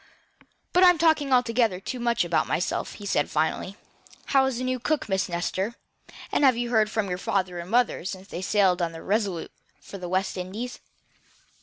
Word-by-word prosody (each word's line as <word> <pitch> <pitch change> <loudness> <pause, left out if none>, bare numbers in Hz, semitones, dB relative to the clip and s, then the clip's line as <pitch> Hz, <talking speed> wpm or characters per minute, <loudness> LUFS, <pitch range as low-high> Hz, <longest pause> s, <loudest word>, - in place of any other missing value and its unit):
"But 360 - +5
I'm 360 -2 +7
talking 315 -4 +3
altogether 230 -5 +2
too 245 +6 -5
much 235 -5 +1
about 170 -1 +1
myself." 175 - -1
he 205 - -10
said, 145 -7 +1
finally. 160 +5 -1 0.6
"How 265 -1 +5
is 260 -3 -2
the 255 - -3
new 255 0 -1
cook 300 +4 -1
Miss 190 -1 0
Nestor; 185 +5 -2 0.6
and - - +1
have 260 -4 +5
you 240 0 -2
heard 220 -2 +3
from 220 -2 -1
your 180 -1 -3
father 185 -2 -1
and 170 +1 -7
mother 240 -3 +2
since 190 +1 -6
they 175 - -6
sailed 190 -2 +2
on 170 -1 -1
the 165 - -9
RESOLUTE 200 -4 -1 0.3
for 195 - -10
the 180 -1 -6
West 190 +1 -1
Indies?" 205 +7 -5
205 Hz, 190 wpm, -26 LUFS, 185-245 Hz, 0.6 s, I'm